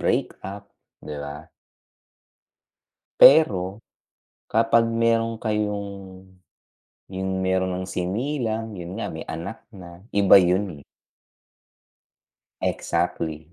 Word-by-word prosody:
breakup, 100 +1 -3 0.3
diba? 75 +1 -8 1.7
Pero 100 - +6 0.7
kapag 115 +1 +3
meron 115 0 +1
kayong 105 -2 -2 1.2
yung 95 0 -4 0.2
meron 95 0 +1
ng 95 - -4
sinilang 110 +3 -2
yun 90 +2 -7
nga - - -3
may 80 - -6
anak 85 +7 -6
na 90 -5 -12
iba 100 -1 +6
yun, 90 -4 0
eh. - - -23 1.8
Exactly, 80 +1 -2
100 Hz, 85 wpm, -24 LUFS, 90-115 Hz, 1.8 s, Pero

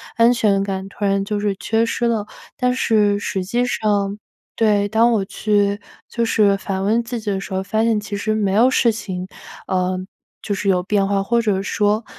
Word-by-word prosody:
安 230 +1 +5
全 210 -5 +2
感 195 -1 -4
突 200 - -9
然 195 0 +1
就 210 0 -2
是 205 -1 -1
缺 225 0 +1
失 235 +1 -1
了， 225 -3 0 0.3
但 250 -1 +1
是 210 -5 +2
实 195 -2 -3
际 240 +6 0
上 205 -4 -1 0.4
对， 210 -2 +2
当 225 +3 +3
我 205 -4 0
去 205 0 0 0.3
就 235 - -2
是 210 -3 +3
反 195 -1 -3
问 220 +4 +2
自 235 0 -4
己 215 -2 -3
的 195 - -1
时 195 - -8
候， 190 0 -1
发 220 +3 0
现 225 -2 +2
其 205 0 -6
实 215 +2 -1
没 200 -3 0
有 230 +5 +5
事 240 -2 +3
情。 185 -4 -5 0.4
呃。 185 0 0 0.4
就 205 - -2
是 200 +1 -1
有 180 -2 +3
变 200 +1 +1
化， 200 0 0
或 235 +4 +1
者 205 -4 0
说， 210 +2 0
205 Hz, 220 characters per minute, -20 LUFS, 195-225 Hz, 0.4 s, 安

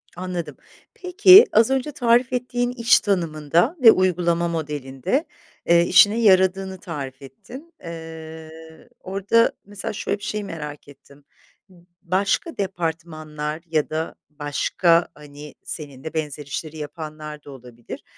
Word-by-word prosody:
Anladım. 175 -5 -5 0.4
Peki, 375 +3 +7
az 225 +2 +4
önce 270 +2 -1
tarif 245 -1 +2
ettiğin 245 0 -1
iş 235 -1 +4
tanımında 170 - 0
ve 225 - +9
uygulama 175 -2 +1
modelinde, 150 - -3 0.4
eee, 170 0 +5
işine 205 +5 +5
yaradığını 190 -2 +3
tarif 140 -6 -7
ettin. 255 - -13
Eee, 160 -1 -9 0.5
orada, 200 +5 +1
mesela, 205 +1 -6
şöyle 200 - -3
bir 205 - -15
şeyi 210 0 -3
merak 150 -6 -8
ettim. 140 0 -18 0.5
B 185 - -20 0.3
başka 190 - -1
departmanlar 160 -4 -4
ya 155 -2 0
da 160 +1 -4
başka, 155 +3 +1
hani, 145 0 -12
seninle 145 0 -7
benzer 150 -2 -4
işleri 155 +3 -6
yapanlar 150 0 -8
da 145 - -12
olabilir, 125 -3 -11
170 Hz, 120 wpm, -22 LUFS, 150-205 Hz, 0.5 s, ve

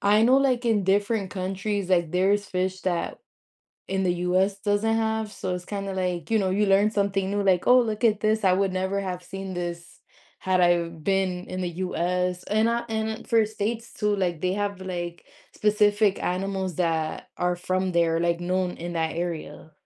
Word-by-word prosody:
I 210 +2 +4
know 250 +3 +5
like 255 -3 +2
in 215 -4 +2
different 200 +1 +1
countries, 195 +1 -3
like 170 -3 +2
there's 195 +3 +2
fish 185 0 -2
that 175 -2 -2 0.7
in 190 0 0
the 180 -1 +2
US 185 +3 +1
doesn't 210 +2 +1
have. 220 -1 0
So, 185 -2 -4
it's 180 0 -5
kind 200 -1 -4
of 190 - -4
like, 180 +2 -2
you 220 - +4
know, 190 -2 +1
you 205 +2 +2
learn 200 +2 +4
something 200 -2 0
new 205 0 0
like, 185 -3 +2
oh, 250 +1 +7
look 220 0 -3
at 215 -2 +3
this, 215 0 +1
I 185 - +5
would 195 0 +1
never 190 +2 -1
have 180 -2 -4
seen 195 0 -6
this 175 -1 -6 0.4
had 185 -1 +1
I 175 -1 +4
been 180 +2 -1
in 185 - -5
the 180 - -1
US 180 0 -1
and 220 +2 +2
I 235 0 0
and 220 0 -3
for 225 -2 +4
states 220 +2 -4
too, 210 -1 0
like 175 -4 -1
they 185 0 +1
have 200 -1 -2
like 175 -2 -5 0.3
specific 210 -1 +2
animals 190 0 -2
that 160 -2 -1
are 180 0 +1
from 185 +1 -1
there, 165 -1 +2
like 170 0 +1
known 180 +1 0
in 175 +1 -5
that 160 -1 0
area. 170 -2 -5
190 Hz, 195 wpm, -25 LUFS, 180-205 Hz, 0.7 s, oh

